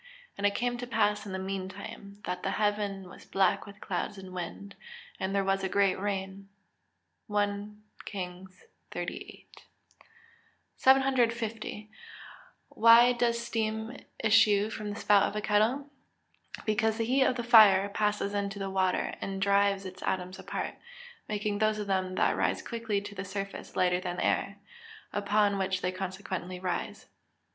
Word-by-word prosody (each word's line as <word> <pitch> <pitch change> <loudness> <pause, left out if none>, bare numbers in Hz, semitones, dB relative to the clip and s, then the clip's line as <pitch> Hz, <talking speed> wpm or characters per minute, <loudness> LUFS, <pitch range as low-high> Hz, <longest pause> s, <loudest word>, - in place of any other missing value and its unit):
And 205 - +2
it 200 - -1
came 245 +2 -1
to 245 - -5
pass 210 -2 +1
in - - -6
the 190 - -3
meantime, 195 +2 -6
that 180 0 -3
the - - -1
heaven 205 -2 -1
was - - -13
black 195 +1 +1
with 200 - -12
clouds 190 +2 -3
and 190 -1 -10
wind, 185 +3 -6 0.5
and 190 +1 -2
there 200 - +2
was 195 0 0
a 190 - 0
great 195 -1 +2
rain." 195 0 -4 0.8
1 205 0 -2 0.2
KINGS 185 -1 -7 0.3
XVIII.] - - -6 1.3
750. 235 -5 +2 0.8
Why 230 +2 +7
does 235 -1 +1
steam 220 +1 -2 0.2
issue 215 -1 +4
from 215 -1 -5
the 205 - -5
spout 205 -1 +5
of - - -10
a - - 0
kettle? 220 +7 +2 0.8
Because 220 0 +1
the 225 - 0
heat 260 +4 +2
of 260 -1 +3
the 240 - -3
fire 210 -5 +7
passes 210 0 -1
into 200 0 -2
the 195 -1 -4
water, 190 -1 +1
and 195 0 -3
drives 200 0 +2
its 185 0 -8
atoms 185 0 -2
apart, - - -4 0.6
making 210 -1 -1
those 215 0 +2
of 210 - -3
them 185 -1 -1
that - - +2
rise - - 0
quickly 225 -4 -2
to 205 0 -8
the 190 -1 -5
surface 195 +1 -6
lighter 180 0 +2
than 180 -1 -4
the - - -1
air, 200 +1 0 0.6
upon 205 0 +2
which 190 -1 -1
they 180 - 0
consequently 185 -1 -5
rise. 180 -1 -3
200 Hz, 155 wpm, -29 LUFS, 190-215 Hz, 1.3 s, Why